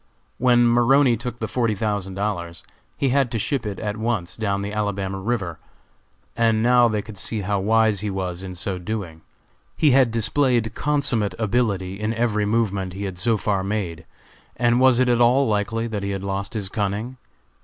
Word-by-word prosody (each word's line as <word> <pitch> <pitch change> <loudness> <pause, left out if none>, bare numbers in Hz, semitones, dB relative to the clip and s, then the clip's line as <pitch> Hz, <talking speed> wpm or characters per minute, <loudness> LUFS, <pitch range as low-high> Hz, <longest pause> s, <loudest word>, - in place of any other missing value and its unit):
When 120 -1 +4
Maroney 120 +2 +4
took 120 +1 -6
the 110 - -3
forty 115 -3 0
thousand 100 -2 -2
dollars, 90 -5 -3 0.3
he 135 - +1
had 135 -1 +2
to - - 0
ship 115 +1 -2
it 100 - -4
at 105 -1 -4
once 110 -6 -2
down 100 -3 -1
the 100 +1 -4
Alabama 100 -2 -2
river, 95 -6 -3 0.8
and 115 -1 +2
now 120 0 +5
they 105 -2 -1
could 105 -3 -10
see 110 -2 -2
how 100 +1 -1
wise 110 0 +2
he 105 +2 -2
was 95 -2 -4
in 95 -1 -7
so 90 +1 -3
doing. 90 -4 -5 0.6
He 150 - +4
had 130 -2 +5
displayed 115 0 +1
consummate 140 -8 0
ability 100 -4 -1
in 110 +2 -2
every 110 -3 0
movement 100 -4 0
he 100 +2 -6
had 95 -2 -5
so 115 +2 +2
far 100 -2 -1
made, 95 -5 -3 0.5
and 120 0 +3
was 130 -2 +5
it 130 - +3
at 120 -1 +3
all 130 +3 +4
likely 110 +2 -1
that 110 -3 -3
he 100 - -3
had 100 -1 -3
lost 100 +2 -3
his 100 -3 0
cunning? 105 +5 -3
110 Hz, 185 wpm, -22 LUFS, 100-120 Hz, 0.8 s, now